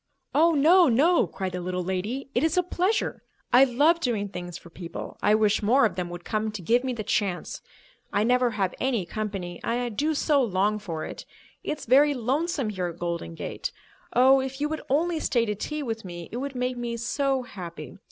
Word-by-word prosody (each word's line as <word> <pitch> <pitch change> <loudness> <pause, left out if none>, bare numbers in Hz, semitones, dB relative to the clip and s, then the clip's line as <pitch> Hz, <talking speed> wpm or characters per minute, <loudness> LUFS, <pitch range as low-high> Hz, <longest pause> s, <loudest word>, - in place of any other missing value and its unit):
"Oh, 330 +3 +5
no, 335 +4 +6
no," 280 - +4
cried 185 +2 -4
the 180 0 -4
little 180 0 -2
lady. 210 +10 -3
"It 245 - +1
is 320 +2 +1
a 360 - +4
pleasure. 365 +4 0 0.3
I 255 +2 +8
love 290 +7 +3
doing 220 -9 -1
things 175 -2 -6
for 170 - -15
people, 170 0 -7
I 210 - +4
wish 215 -1 +2
more 230 +4 +4
of 215 - 0
them 180 -1 -3
would 175 0 -8
come 215 0 -1
to 205 - -5
give 240 +8 +3
me 260 - -1
the 230 -3 -4
chance. 200 -4 -1 0.5
I 205 - +2
never 250 +1 +3
have 200 -5 -1
any 245 -8 0
company, 195 -4 -4
and 230 - 0
I 245 -1 -2
do 295 +8 0
so 290 -1 +3
long 210 -2 +1
for 165 -6 -5
it. - - -8 0.4
It's 305 - -4
very 285 +4 +5
lonesome 270 +2 -1
here 185 -3 -2
at 170 -1 -7
Golden 170 - -4
Gate. - - -4 0.4
Oh, 260 +2 +6
if 265 +1 -4
you 295 - +1
would 315 0 -3
only 325 +4 +1
stay 240 -6 +1
to 210 - -1
tea 300 +9 -4
with 225 -3 -4
me, 175 -2 -8
it 235 - -4
would 275 +1 -4
make 250 0 -1
me 235 -1 -3
so 270 +2 0
happy. 175 -6 -9
235 Hz, 210 wpm, -26 LUFS, 190-275 Hz, 0.5 s, I